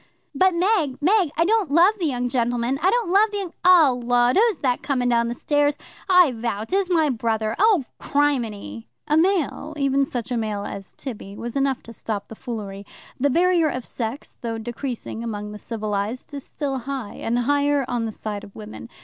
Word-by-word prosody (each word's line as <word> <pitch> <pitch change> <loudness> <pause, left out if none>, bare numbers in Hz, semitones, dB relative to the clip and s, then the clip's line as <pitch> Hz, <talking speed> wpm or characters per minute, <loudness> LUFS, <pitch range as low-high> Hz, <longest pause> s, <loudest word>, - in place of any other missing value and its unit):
"But, 370 +5 +3
Meg, 340 -8 +1
Meg, 365 +2 +3
I 330 - +3
don't 425 -3 +2
love 340 +8 +5
the 340 - +1
young 250 -3 -1
gentleman; 245 +1 0
I 365 - +4
don't 455 -4 +1
love 420 +3 +5
the 415 - -4
young 380 -4 -4
0 345 -7 +7 0.2
lud, 245 0 +4
who's 440 -2 +4
that 255 -4 0
coming 250 -3 0
down 235 -1 +2
the 235 - -3
stairs? 290 +2 +1 0.3
I 360 -6 +6
vow 230 -3 -3
'tis 380 - 0
my 320 -5 +3
brother. 220 -2 -1
0 410 - +4
crimini!" 225 - -1 0.2
A 300 - +2
male 320 -3 +1
even 275 -1 +2
such 250 -2 -4
a 245 - 0
male 210 -2 -2
as 195 -2 -7
Tibby 210 -7 -8
was 240 +1 -6
enough 275 -1 0
to 230 - -11
stop 210 -3 -5
the 225 - -8
foolery. 210 -5 -6 0.4
The 285 +3 +2
barrier 340 +1 +3
of 255 -3 -4
sex, 235 +4 -5
though 230 -2 -3
decreasing 240 0 -5
among 210 -2 -5
the 210 - -8
civilized, 215 +4 -4
is 280 -2 -6
still 275 -3 -3
high, 255 -3 -5
and 230 +1 -1
higher 285 +2 +2
on 240 -2 -1
the 220 - -3
side 210 -1 -5
of 200 - -13
women. 220 +2 -9
260 Hz, 195 wpm, -23 LUFS, 225-315 Hz, 0.4 s, 0